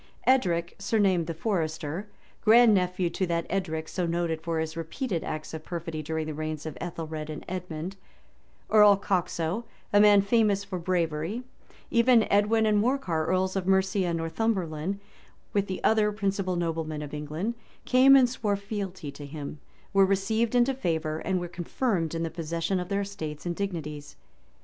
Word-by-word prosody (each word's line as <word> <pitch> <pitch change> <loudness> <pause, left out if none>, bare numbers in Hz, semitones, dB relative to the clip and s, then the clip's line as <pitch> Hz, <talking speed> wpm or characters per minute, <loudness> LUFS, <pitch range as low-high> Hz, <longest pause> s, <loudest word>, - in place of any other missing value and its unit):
Edric, 175 -10 +2
surnamed 195 -5 +2
the 165 - -3
Forester, 165 -1 -2 0.4
grand 230 +1 +7
nephew 180 -1 +1
to 185 - -1
that 170 -1 -1
Edric 160 -4 -2
so 180 -2 -2
noted 165 -1 -1
for 165 0 -2
his 160 0 -2
repeated 165 - -3
acts 155 0 -5
of 160 -1 -6
perfidy 165 -2 -5
during 160 +1 -3
the 155 - -4
reigns 155 0 -4
of 155 - -5
Ethelred 160 -3 -5
and 155 - -6
Edmond; 180 0 -5 0.7
Earl 210 -2 +7
Coxo, 180 +1 -1 0.3
a 205 - +6
man 205 -1 +7
famous 205 -2 +2
for 195 -2 -5
bravery; 170 +4 -1 0.5
even 235 -1 +5
Edwin 215 +2 +3
and 210 -1 +3
Morcar, 210 - 0
earls 185 +1 +1
of 190 -1 -2
Mercia 190 0 +2
and 170 -1 0
Northumberland; 175 0 -1 0.5
with 200 -1 +1
the 185 - -5
other 215 -1 +3
principal 195 -3 -1
noblemen 160 -3 -2
of 145 - -8
England, 155 +9 -3 0.3
came 265 +2 +7
and 260 -2 +6
swore 220 -4 -1
fealty 195 -6 -5
to 145 0 -9
him; 145 0 -7 0.3
were 195 0 +6
received 215 +5 +1
into 245 +2 +4
favor; 160 -9 -1
and 185 +2 -1
were 175 - -4
confirmed 175 - -1
in 165 - -1
the 165 - -3
possession 165 +3 -2
of 180 - -5
their 200 0 0
estates 160 -7 -6
and 175 -1 -2
dignities. 150 -7 -5
180 Hz, 165 wpm, -27 LUFS, 160-205 Hz, 0.7 s, grand